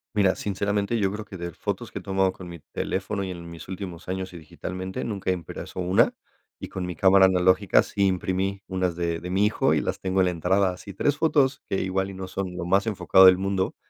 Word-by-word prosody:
Mira, 100 -3 +3
sinceramente, 100 +2 -1
yo 95 -1 +1
creo 105 +1 -6
que 95 - -9
de 85 0 -5
fotos - - -4
que - - -6
he - - -5
tomado 95 -1 +1
con 90 - -10
mi 85 -1 -9
teléfono 100 +1 -2
y 95 - -4
en 85 -1 -8
mis 85 -1 -10
últimos 90 -3 -7
años, 95 0 -3
y - - -8
digitalmente 95 +4 -6
nunca 100 -4 -2
he - - +3
impreso 90 +1 -7
una, 90 +1 +3 0.5
y - - -6
con 95 -1 -5
mi 90 -2 -5
cámara 95 +2 +6
analógica 95 0 +4
sí 100 - 0
imprimí 95 +1 -1
unas 90 -2 -1
de 85 -1 -1
de 90 - -7
mi 100 +3 +3
hijo, 110 - +2
y - - +2
las - - -3
tengo 95 0 +1
en - - +4
la 90 - +1
entrada. 95 +3 +2
Así 100 +2 -9
3 145 +10 0
fotos 145 -4 +2
que 95 - -1
igual, 95 +1 -1
y - - -10
no 95 0 -6
son 95 -1 -4
los 85 -1 -4
más 100 +3 +3
enfocado 95 -3 +5
del 95 0 +7
mundo, 95 -1 -1
95 Hz, 235 wpm, -25 LUFS, 90-100 Hz, 0.5 s, del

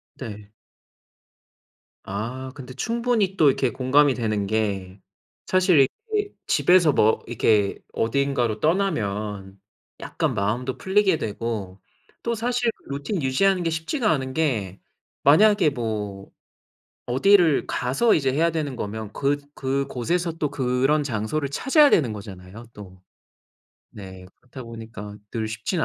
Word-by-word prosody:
네. 105 -4 -9 1.5
아 120 +7 -5
근데 130 -3 -10
충분히 230 - 0
또 150 - +5
이렇게 130 -2 +1
공감이 135 +3 +3
되는 110 -4 -1
게 100 -3 -2 0.5
사실 185 -7 +4 0.3
이렇게 415 -1 -1
집에서 175 -4 +4
뭐 110 -2 +2
이렇게 105 -3 +1
어딘가로 120 -2 0
떠나면 105 - -1 0.4
약간 - - -2
마음도 120 +6 -2
풀리게 190 -3 +2
되고 105 -4 -4 0.4
또 235 0 -1
사실 240 +1 0 0.2
루틴 145 +6 -3
유지하는 180 +8 +2
게 165 - 0
쉽지가 210 - -1
않은 130 -3 -2
게 115 - -1 0.4
만약에 190 +2 +5
뭐 105 -6 -5 0.8
어디를 165 +4 +4
가서 135 - +1
이제 135 -4 +1
해야 165 +5 +2
되는 150 -5 -3
거면 110 -1 -5
그 140 +1 0 0.2
그곳에서 140 +5 -1
또 155 -3 -3
그런 135 +3 +1
장소를 135 +3 -2
찾아야 290 - +4
되는 125 -9 +3
거잖아요 100 +2 -10
또. 95 -3 -13 0.9
네 95 -2 -11
그렇다 130 +1 -11
보니까 115 -3 -9
늘 110 -2 -3
쉽지는 115 - -2
130 Hz, 260 characters per minute, -24 LUFS, 110-160 Hz, 1.5 s, 또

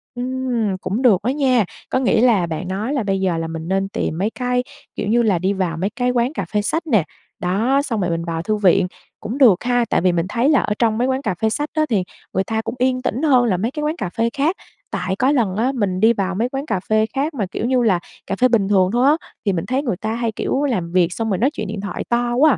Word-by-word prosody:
Ừ, 245 - -4 0.6
cũng 210 +6 -2
được 215 -8 +4
đó 240 - 0
nha, 260 -5 +2 0.2
có 260 - +1
nghĩa 240 -3 +2
là 225 -8 +4
bạn 165 +3 -4
nói 205 +8 -2
là 270 -5 0
bây 195 -1 0
giờ 180 -3 +1
là 165 0 -2
mình 160 0 -6
nên 195 +1 0
tìm 160 - -2
mấy 200 +5 0
cái, 250 +1 -1 0.3
kiểu - - -3
như 235 +3 +3
là, 200 -6 +2
đi 190 +3 +1
vào 180 -4 -2
mấy 190 +4 -1
cái 245 +3 -1
quán 245 +3 0
cà - - -3
phê 210 - +2
sách 325 +9 -2
nè, 215 - +3 0.4
đó, 220 +10 +1
xong 230 -7 -2
rồi 180 - 0
mình 165 0 -1
vào 165 -1 -2
thư 215 +5 -1
viện, 195 -2 +3 0.3
cũng 235 +6 -5
được 230 -10 +5
ha, 245 -1 +2
tại - - +2
vì 180 0 +3
mình 170 -1 0
thấy 245 +5 +1
là 295 - +5
ở 210 - -1
trong 225 -2 +2
mấy 245 - +1
quán 265 0 0
cà 200 -9 -2
phê 220 - +3
sách 295 +6 -2
á 310 -1 +2
thì 205 -6 +1 0.3
người 190 - +1
ta 220 +3 -2
cũng - - -5
yên 255 0 +1
tĩnh 255 0 -2
hơn 255 -5 +4
là 195 -6 +1
mấy 220 +7 -1
cái 300 +2 -4
quán 305 +2 0
cà 180 - -3
phê 230 +5 0
khác. 310 +7 +2 0.4
Tại 190 0 -2
có 255 +7 +2
lần 225 -10 +1
á 235 +5 +1
mình 190 -6 -1
đi 225 +2 +5
vào 190 -3 -2
mấy 235 +5 0
quán 270 +2 -4
cà 190 - -1
phê 215 0 +3
khác 285 +4 -1
mà, 225 -8 -1
kiểu - - -3
như 250 0 +2
là, 190 -6 +3 0.3
cà 195 - -1
phê 255 +5 +4
bình 225 -5 +2
thường 190 -3 +4
thôi 245 +4 +3
á, - - -19 0.2
thì 200 - +2
mình 165 -2 -2
thấy 260 +3 -1
người 235 -10 -2
ta 220 +2 -3
hay, 235 -1 -1
kiểu, 265 +5 -1
làm 190 -12 -1
việc 175 -1 +2
xong 225 +2 -2
rồi 190 - +1
nói 255 +6 +2
chuyện 215 -8 -4
điện 205 0 -5
thoại 200 -3 -4
to 240 0 +1
quá 305 +4 +5
à, - - +1
220 Hz, 285 wpm, -20 LUFS, 190-255 Hz, 0.6 s, được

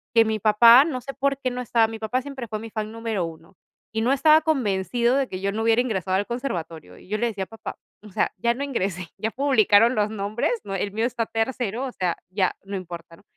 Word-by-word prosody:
que 225 - +7
mi 220 0 -1
papá, 230 +6 +7
no 255 -6 -3
sé 275 +1 -7
por 275 0 0
qué 255 -2 -2
no 250 - -5
estaba. 230 -2 +2
Mi 225 0 -7
papá 240 +4 -1
siempre 265 -3 -7
fue 215 0 -4
mi 225 +1 -8
fan 215 -1 -4
número 225 -6 -2
1, 165 +3 -11 0.4
y 220 - -1
no 250 +4 +2
estaba 310 +3 +6
convencido 240 -3 +1
de 270 -2 +1
que 185 0 -6
yo 200 0 0
no 220 +2 -2
hubiera 230 +1 +4
ingresado 190 -6 -1
al 205 - -1
conservatorio. 165 - -5
Y - - -17
yo 215 - 0
le 235 - 0
decía: 200 -4 -3
"Papá, 225 - -8 0.3
o - - -11
sea, - - 0
ya 235 +5 +1
no 275 +3 -4
ingresé, 190 -10 -2
ya 220 +1 -2
publicaron 235 -3 +4
los 210 0 +1
nombres, 215 - -2
¿no?, 195 -1 -5
el 200 +1 -2
mío 225 +2 0
está 235 -2 -1
tercero, 235 +1 -2
o - - -6
sea, 180 -5 -1
ya 185 -1 0
no 200 0 -6
importa, 170 -2 -9
¿no?". - - -22
225 Hz, 240 wpm, -24 LUFS, 195-250 Hz, 0.4 s, que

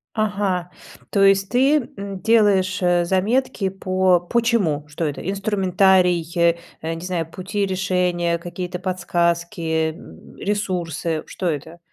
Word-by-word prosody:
Ага, 200 -4 -1 0.4
то 200 - +2
есть 195 0 +4
ты, 270 +5 +4 0.2
м, 195 -1 -6
делаешь, 200 -4 +3
э, 175 -1 +3
заметки 195 +3 0
по 185 -1 +2
по 235 +7 0
чему, 195 -11 +1
что 150 +3 -4
это? 145 -2 -3
Инструментарий, 190 -3 +2 0.6
э, 165 +1 -2
не 165 +2 -8
знаю, 165 -3 -2
пути 200 +3 -2
решения, 180 -2 0
какие-то 175 +1 -5
подсказки, 175 -1 -1
э, 160 -1 0
м, 80 - -14
ресурсы. 175 -6 -2
Что 185 - -5
это? 160 +2 -3
185 Hz, 130 wpm, -21 LUFS, 170-195 Hz, 0.6 s, есть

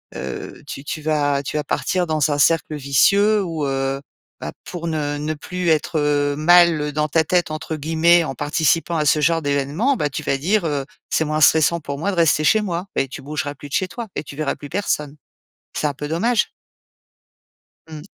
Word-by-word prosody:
heu - - -7
tu 140 +1 -7
tu 155 - -4
vas 145 -2 0
tu 145 - -3
vas 150 - -2
partir 180 -1 -1
dans 155 -2 +1
un 145 - 0
cercle 155 0 +2
vicieux 200 +10 +3
où, 165 -5 -3
heu, 135 0 -2 0.4
bah, - - -6
pour 170 -1 -6
ne 150 -2 -2
ne 150 +2 -2
plus 180 +4 -5
être, 155 0 +1
heu, 145 -1 +1
mal 160 -2 +4
dans 150 +1 0
ta 160 +2 +2
tête, 175 -1 +1
entre 155 +1 -4
guillemets, 165 +3 +3
en 135 - -5
participant 160 +4 +1
à 155 - +1
ce 150 - +3
genre 165 +2 +2
d'événement, 145 - 0
bah, 150 - 0
tu 130 - -5
vas 135 - 0
dire, 190 +8 +1
heu: 145 -4 -2 0.2
«C'est 160 - +1
moins 155 +1 -1
stressant 160 +2 +4
pour 140 -1 -5
moi 200 +5 -1
de - - -4
rester 160 -2 +3
chez 215 +5 +4
moi» 180 -2 -3
et 135 - 0
tu - - -8
bougeras 145 0 -4
plus 145 - -11
de - - -11
chez 185 - 0
toi 235 +2 -6
et - - -3
tu 140 0 -11
verras 155 -3 -1
plus 145 - -10
personne. 150 -6 -2 0.6
C'est 150 - 0
un 145 - -2
peu 145 +2 -6
dommage. 215 +9 +1 1.4
Mmh. 155 -2 -9
155 Hz, 210 wpm, -21 LUFS, 145-170 Hz, 1.4 s, mal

